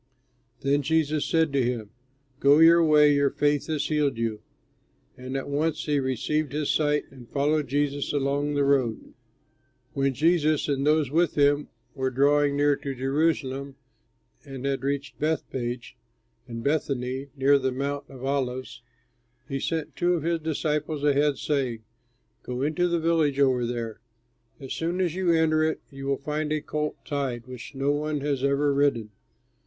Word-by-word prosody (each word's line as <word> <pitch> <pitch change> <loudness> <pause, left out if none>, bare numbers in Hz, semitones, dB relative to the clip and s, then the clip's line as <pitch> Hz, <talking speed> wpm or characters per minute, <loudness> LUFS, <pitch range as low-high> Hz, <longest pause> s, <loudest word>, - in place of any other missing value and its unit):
Then 140 +1 +2
Jesus 155 0 +1
said 160 -3 +2
to 140 - +2
him, 120 -4 -3 0.5
"Go 140 +1 +5
your 165 +1 +7
way, 150 -2 +5
your 140 -1 +3
faith 145 0 0
has 155 -2 -1
healed 145 -5 0
you." 115 -2 -2 0.7
And 130 +1 -5
at 135 - -5
once 155 +2 -1
he 145 -2 +1
received 135 +3 -1
his 150 -1 0
sight, 150 -1 +1
and 125 -3 -14
followed 150 +1 +1
Jesus 145 +1 -1
along 145 +1 0
the 145 - +2
road. 130 -5 0 0.8
When 135 -1 0
Jesus 155 +1 +2
and 140 -1 0
those 150 -3 +2
with 170 +2 +2
him 145 0 +3 0.3
were 130 0 -1
drawing 140 +2 +2
near 145 0 +3
to 140 -1 -5
Jerusalem 135 0 -1 0.7
and 135 -2 -8
had 135 -2 -1
reached 140 0 -3
Bethpage 130 -6 -3 0.5
and 115 -1 -6
Bethany, 135 -3 -1
near 140 +1 +4
the 130 -1 -1
Mount 140 +2 -3
of 130 -1 -9
Olives, 130 -2 -2 0.7
he 135 0 -3
sent 155 -1 -3
two 175 0 +2
of 160 - -3
his 170 0 0
disciples 150 -1 -2
ahead, 145 0 +2
saying, 130 -6 -2 0.6
"Go 125 +1 -4
into 160 +5 +1
the 170 0 +1
village 160 -4 +1
over 130 -3 +3
there. 115 -2 -4 0.6
As 135 -2 -6
soon 170 +3 -2
as 180 -4 +1
you 185 -1 +1
enter 160 -1 +3
it, 160 0 0
you 135 0 -7
will 140 0 +1
find 150 +1 -3
a 155 - +1
colt 150 0 -3
tied, 135 -6 -3
which 130 +2 -10
no 135 +1 +1
one 150 0 -1
has 140 -2 -1
ever 140 +1 +2
ridden. 140 -7 +1
145 Hz, 160 wpm, -26 LUFS, 135-150 Hz, 0.8 s, your